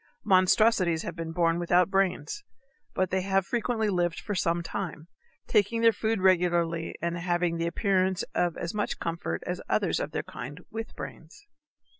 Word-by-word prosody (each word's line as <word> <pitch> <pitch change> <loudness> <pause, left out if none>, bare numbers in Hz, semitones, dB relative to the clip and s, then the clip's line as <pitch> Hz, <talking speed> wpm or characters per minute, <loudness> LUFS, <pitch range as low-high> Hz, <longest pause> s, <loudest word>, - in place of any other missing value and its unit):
Monstrosities 185 -3 +4
have 170 - -5
been 165 -1 -5
born 165 0 +1
without 175 +2 +3
brains; 195 - 0 0.5
but 185 -1 0
they 190 0 +1
have 195 0 +1
frequently 230 -1 0
lived 175 -4 0
for 205 - -4
some 170 -2 0
time, 165 -3 -5 0.4
taking 220 +2 +2
their 230 0 +6
food 220 -1 -1
regularly 170 -3 +2
and 170 0 -1
having 175 -1 0
the 165 0 -1
appearance 190 0 +1
of 175 -2 0
as 170 - -4
much 210 -1 -2
comfort 165 - -3
as - - -3
others - - +1
of - - -2
their - - -3
kind 145 +7 -8
with 225 +1 -6
brains. 165 - -10
180 Hz, 165 wpm, -28 LUFS, 170-200 Hz, 0.5 s, their